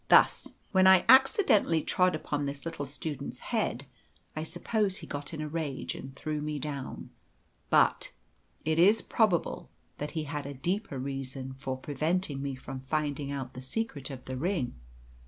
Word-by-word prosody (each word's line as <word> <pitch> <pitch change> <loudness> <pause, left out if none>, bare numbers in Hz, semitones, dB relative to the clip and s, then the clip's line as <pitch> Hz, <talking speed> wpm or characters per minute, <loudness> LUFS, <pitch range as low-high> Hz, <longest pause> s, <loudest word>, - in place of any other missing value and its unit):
Thus, - - +6 0.2
when 190 -1 +6
I 190 -1 +7
accidentally 260 - +6
trod 180 -2 +3
upon 145 -2 -2
this 140 +1 -5
little 145 -4 -4
student's 145 0 -5 0.2
head, - - 0 0.5
I 155 - -2
suppose 190 +5 0
he - - -7
got 145 0 -5
in 155 -2 -5
a 155 - -2
rage, 150 -3 -3
and 135 0 -8
threw 150 +1 -3
me 150 0 -2
down. 140 -1 -5 0.6
But - - +4 0.5
it 160 +1 +2
is 205 +6 +6
probable 210 -7 +1 0.3
that 150 +1 -4
he 155 - 0
had 145 -1 -4
a 140 - -6
deeper 175 - -1
reason 135 0 -4
for 130 0 -4
preventing 150 +2 -1
me 140 -1 -3
from 130 0 -7
finding 145 +1 -2
out 135 -2 -4
the 130 - -7
secret 145 - -3
of 130 -2 -8
the 130 0 -4
ring. 165 -3 -1
150 Hz, 165 wpm, -30 LUFS, 135-175 Hz, 0.6 s, I